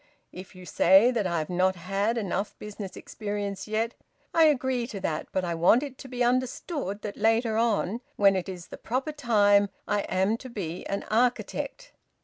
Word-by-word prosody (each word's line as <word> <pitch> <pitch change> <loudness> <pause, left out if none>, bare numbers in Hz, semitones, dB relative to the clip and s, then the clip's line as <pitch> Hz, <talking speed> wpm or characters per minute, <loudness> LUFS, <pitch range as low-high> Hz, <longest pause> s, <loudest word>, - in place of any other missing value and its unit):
If 185 +1 -11
you 185 0 -11
say 195 +8 +5
that 220 -6 0
I 170 -1 -1
have 155 -1 -2
not 185 +1 +2
had 195 +6 -1
enough 200 -1 -2
business 205 -2 -8
experience 205 -2 -5
yet, 220 +2 -1 0.4
I 325 -1 +6
agree 260 -5 +1
to 215 -5 -6
that, 155 -4 -2
but 185 -1 -1
I 170 - -1
want 175 - +4
it 275 -3 -8
to - - -9
be 250 -1 -1
understood 250 - -1
that 205 -1 -5
later 225 +1 +2
on, 225 -1 +1
when 200 -1 +5
it 185 +1 -2
is 180 -2 -8
the - - -8
proper 260 +6 -2
time, 205 -8 +3 0.2
I 205 - +1
am 190 +4 +1
to 255 - -10
be 180 -7 -5
an 200 - -2
architect. 250 - -1
210 Hz, 185 wpm, -27 LUFS, 190-240 Hz, 0.4 s, I